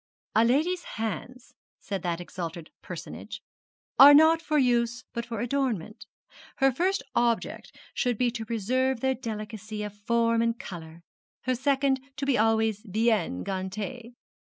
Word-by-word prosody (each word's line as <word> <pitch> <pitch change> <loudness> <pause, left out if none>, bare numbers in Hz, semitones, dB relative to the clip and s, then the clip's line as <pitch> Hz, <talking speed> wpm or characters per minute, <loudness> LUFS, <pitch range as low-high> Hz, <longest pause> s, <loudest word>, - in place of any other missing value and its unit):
'A 220 - +6
lady's 320 +9 +1
hands,' 225 +4 -5 0.3
said 195 -3 -4
that 170 -1 -2
exalted 170 -2 -6
personage, - - -8 0.6
'are 285 +2 +11
not 320 +2 +6
for 310 -2 0
use, 240 -2 +2
but 235 0 -4
for 235 -1 -3
ornament. 220 -7 -2 0.5
Her 270 0 +3
first 360 +5 0
object 235 -1 -1 0.2
should 245 -3 0
be 245 0 +2
to 230 -1 -5
preserve 235 +3 0
their 265 0 +2
delicacy 215 -2 -6
of 210 -1 -5
form 230 +2 +1
and 230 0 0
colour; 165 -3 -9 0.4
her 255 - 0
second 270 +1 +1 0.2
to 275 - -2
be 275 -2 +2
always 220 -1 +2
bien 210 - 0
gantée. 215 +6 -5
230 Hz, 140 wpm, -27 LUFS, 210-260 Hz, 0.6 s, are